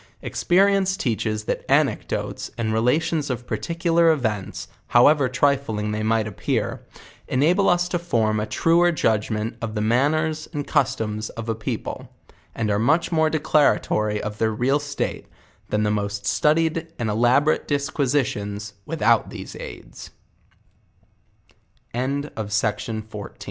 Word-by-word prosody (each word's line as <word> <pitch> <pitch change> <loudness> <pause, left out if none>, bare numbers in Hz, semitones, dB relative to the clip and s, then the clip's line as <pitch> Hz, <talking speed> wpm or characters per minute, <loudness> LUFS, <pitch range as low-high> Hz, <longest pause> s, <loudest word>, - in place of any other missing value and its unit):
Experience 195 +1 +2
teaches 110 -3 -1
that - - -3
anecdotes, - - 0
and 110 -2 -1
relations 145 +6 +1
of 125 -1 -3
particular 165 +9 +1
events, 110 -11 -1 0.2
however 135 +2 +5
trifling 130 -5 0
they 105 0 -2
might 110 0 +1
appear, 105 - -2 0.5
ena 145 +7 +3
ble 200 +1 +2
us 175 0 +2
to 175 0 -1
form 110 -10 0
a 105 - -2
truer 170 +9 +3
judgement 110 -5 0
of 115 -1 -4
tho 105 - -1
manners 155 +7 +1
and 145 -2 -3
customs 110 0 -1
of 115 -1 -7
a - - +2
people, 110 0 -5 0.5
and 110 -2 -1
are 100 - +1
much 155 +11 +2
more 160 -1 +3
declaratory 145 -9 +2
of 105 0 -5
their 110 - +2
real 125 +6 +1
state, 145 -1 -4 0.4
than 105 0 +1
the 105 - +1
most 100 -1 -2
studied 165 +1 +1
and 115 -3 -1
elaborate 125 +7 +2
disquisitians 125 -8 -1
wit 165 0 -4
125 Hz, 120 wpm, -23 LUFS, 110-155 Hz, 0.5 s, however